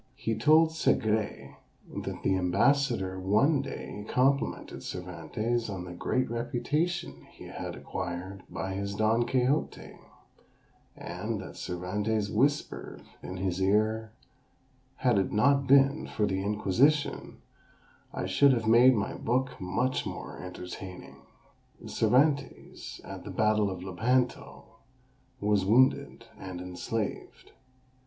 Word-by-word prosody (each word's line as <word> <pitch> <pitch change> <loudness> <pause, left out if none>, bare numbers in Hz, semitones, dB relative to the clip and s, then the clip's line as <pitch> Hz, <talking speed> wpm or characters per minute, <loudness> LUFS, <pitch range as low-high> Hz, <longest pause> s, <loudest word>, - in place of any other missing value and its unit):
He 115 -4 -2
told 160 +4 +5
Segrais 110 -9 0 0.4
that - - -5
the 95 - +2
ambassador 95 +1 +1
one 120 +10 +3
day 105 -6 -7
complimented 135 +2 0
Cervantes 90 +7 -3
on 95 -3 -5
the 90 - -8
great 130 +8 -1
reputation 125 +9 -2
he - - -14
had - - -6
acquired 95 +1 -5
by 95 0 -4
his 100 +1 -3
Don 110 +3 +2
Quixote; 130 +4 -1 1.0
and 100 +5 -4
that - - -9
Cervantes 100 +4 -2
whispered 145 +6 -1 0.2
in 95 - -7
his 95 0 -2
ear, 110 +3 +1 0.8
"Had 120 -6 +2
it 95 - -1
not 140 +5 +3
been 135 +2 +4
for 105 - 0
the 95 -1 -1
Inquisition, 110 +9 +1 0.7
I - - -3
should 130 +9 +4
have 115 -3 -1
made 120 +3 +7
my 105 -1 -1
book 130 +3 0
much 125 +8 -1
more - - -7
entertaining." 90 0 -8 0.7
Cervantes, 140 +3 0
at - - -8
the - - -8
battle 105 -1 +2
of 90 -2 -6
Lepanto, 120 +7 -1 0.8
was 105 -1 +2
wounded, 125 +7 +3
and 95 -2 -7
enslaved. 90 +4 -5
110 Hz, 115 wpm, -29 LUFS, 95-130 Hz, 1.0 s, made